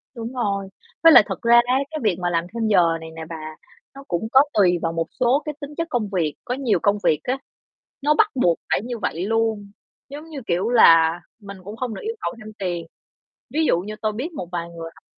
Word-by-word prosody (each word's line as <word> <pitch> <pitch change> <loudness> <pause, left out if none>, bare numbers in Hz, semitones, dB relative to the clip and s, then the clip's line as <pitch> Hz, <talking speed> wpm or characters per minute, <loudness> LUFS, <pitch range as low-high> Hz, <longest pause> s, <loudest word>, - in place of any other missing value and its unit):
Đúng 230 +1 -6
rồi, 200 -6 -2 0.3
với 330 - +9
lại - - +9
thật - - -5
ra 235 0 +5
á 250 +1 +1 0.2
cái 310 - -4
việc 210 -5 +2
mà 175 -1 -1
làm 170 -1 0
thêm 230 -1 -1
giờ 170 -6 +3
này 160 - -8
nè 165 - -7
bà 155 -1 -7 0.4
nó 275 - -10
cũng 175 +5 -2
có 265 - +7
tùy 180 -4 +4
vào 165 - -1
một 165 0 -2
số 255 +3 +3
cái 300 -2 -4
tính 285 - -6
chất 335 0 -2
công 235 -7 -1
việc, 170 -6 -1
có 245 - -2
nhiều 255 -4 0
công 205 0 +3
việc 155 - +3
á, 255 +2 -1 0.6
nó 295 +2 +3
bắt 425 +7 +4
buộc 175 -10 +2
phải - - +2
như 240 0 -5
vậy 175 -3 -2
luôn, 220 -2 -1 0.4
giống 300 +3 -9
như, 295 -4 -7
kiểu, 185 +6 0
là 165 -7 +6 0.2
mình 200 -1 -9
cũng 205 +4 -9
không 245 -3 -3
được - - -7
yêu 450 +1 -3
cầu - - -2
thêm 215 -1 -10
tiền. 175 -3 -3 0.7
Ví 315 +2 +2
dụ 170 - +3
như 210 +4 -6
tôi 215 -1 0
biết 275 +11 -5
một 185 - -6
vài 170 -1 -3
người 165 -1 -8
học - - -21
215 Hz, 240 wpm, -22 LUFS, 175-250 Hz, 0.7 s, với